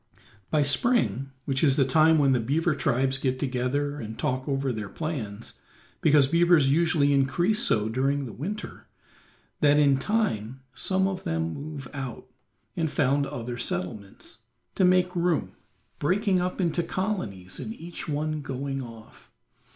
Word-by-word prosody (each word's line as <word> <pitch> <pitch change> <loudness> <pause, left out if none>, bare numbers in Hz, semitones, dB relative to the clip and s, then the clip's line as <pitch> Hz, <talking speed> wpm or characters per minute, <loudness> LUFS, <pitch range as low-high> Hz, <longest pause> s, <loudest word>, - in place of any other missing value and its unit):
By 150 -2 +2
spring, 135 - +2 0.2
which 135 +1 0
is 140 -4 +4
the 135 - +3
time 155 +4 +4
when 140 -2 +4
the 125 - +3
beaver 150 +8 +1
tribes 135 -1 0
get 130 -1 0
together 140 +3 -1
and 110 -3 -7
talk 130 0 -2
over 135 -2 0
their 105 -3 -5
plans, 115 -10 -5 0.5
because 145 -3 +5
beavers 170 -3 +4
usually 155 -2 +3
increase 170 +10 +2
so 105 -1 +2
during 135 +4 0
winter, 205 +8 -6 0.7
that 145 0 +4
in 140 -2 +4
time 135 - -1
some 190 +8 +1
of 190 -1 -4
them 80 0 -2
move 145 -2 -7
out, 135 -4 -6 0.5
and 160 -2 0
found 140 0 +1
other 120 -1 -5
settlements, 100 +1 -5 0.3
to 190 - +1
make 180 0 +3
room, 170 - 0 0.5
breaking 190 +4 +1
up 180 +2 -3
into 175 -1 +1
colonies 110 - -4
and 220 - -6
each 170 -2 -8
one 155 +1 -2
going 135 0 -4
off. 115 -3 -12
140 Hz, 145 wpm, -26 LUFS, 125-165 Hz, 0.7 s, because